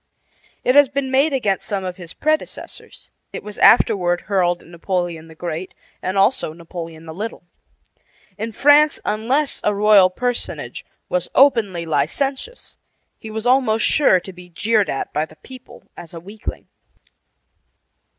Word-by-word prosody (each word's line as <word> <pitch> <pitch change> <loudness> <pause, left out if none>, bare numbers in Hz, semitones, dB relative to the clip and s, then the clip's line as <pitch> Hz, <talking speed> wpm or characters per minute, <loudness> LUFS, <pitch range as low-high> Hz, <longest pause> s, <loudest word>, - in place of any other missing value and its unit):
It 250 - +3
had 285 -1 +6
been 270 -2 -1
made 275 +4 +3
against 210 -8 -1
some 200 -3 -2
of 180 -1 -5
his 175 -2 -10
predecessors. 310 +1 -4 0.2
It - - -7
was 210 -1 -8
afterward 180 -7 +4
hurled 180 -3 0
at - - -18
Napoleon 170 -1 -3
the 160 - -14
Great, 170 +2 -5 0.3
and 185 +1 -2
also 195 -4 +2
Napoleon 165 -1 -9
the 160 - -8
Little. 215 +5 -6 0.9
In 220 +3 -5
France, 290 +5 +4
unless 250 +8 0
a 210 - +1
royal 205 -2 +6
personage 245 +5 -3 0.2
was 180 -1 -2
openly 220 -11 +3
licentious, 270 - -2 0.4
he 220 - -9
was 220 +1 -5
almost 245 -4 +3
sure 275 -11 +4
to 190 +2 -11
be 180 0 -14
jeered 210 +4 +1
at 135 - -4
by 150 - +1
the 155 - -17
people 255 +7 -14
as 170 0 -11
a - - -6
weakling. 200 +6 -8
200 Hz, 150 wpm, -20 LUFS, 175-250 Hz, 0.9 s, had